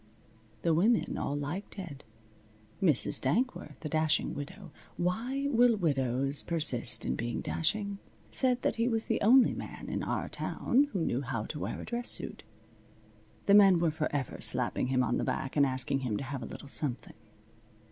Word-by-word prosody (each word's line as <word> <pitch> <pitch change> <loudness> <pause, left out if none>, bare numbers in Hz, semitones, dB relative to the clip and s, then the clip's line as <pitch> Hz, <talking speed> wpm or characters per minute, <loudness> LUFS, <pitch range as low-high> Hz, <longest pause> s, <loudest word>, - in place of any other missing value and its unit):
The 170 - +2
women 210 +8 +2
all 140 - -2
liked 145 +8 -5
Ted. 170 -9 -8 0.8
Mrs. 160 -9 +2
Dankworth, 155 - -1
the 155 - -4
dashing 155 0 +1
widow 175 +5 -8 0.3
(why 235 +10 -1
will 240 -1 +4
widows 135 -4 0
persist 155 -8 +2
in 65 - -1
being 120 0 -3
dashing?), 200 +4 -1 0.3
said 250 -1 +1
that - - 0
he 230 +1 +1
was 225 -2 0
the - - -1
only 245 +4 +5
man - - -8
in - - -2
our - - -2
town 270 +4 +1
who 175 -5 -1
knew 125 - -1
how 125 -5 -3
to 150 - -6
wear - - -4
a - - -7
dress 240 +1 -2
suit. - - +3 1.0
The 200 - +4
men 195 -3 +7
were 165 -1 +1
forever 150 -3 -3
slapping - - +1
him 130 0 +1
on 120 0 0
the - - -1
back 135 - -3
and 140 -2 +4
asking 130 +1 -1
him 120 -6 -2
to - - -4
have 135 0 -5
a - - -6
little - - -10
something. 140 -2 -1
160 Hz, 175 wpm, -30 LUFS, 135-210 Hz, 1.0 s, men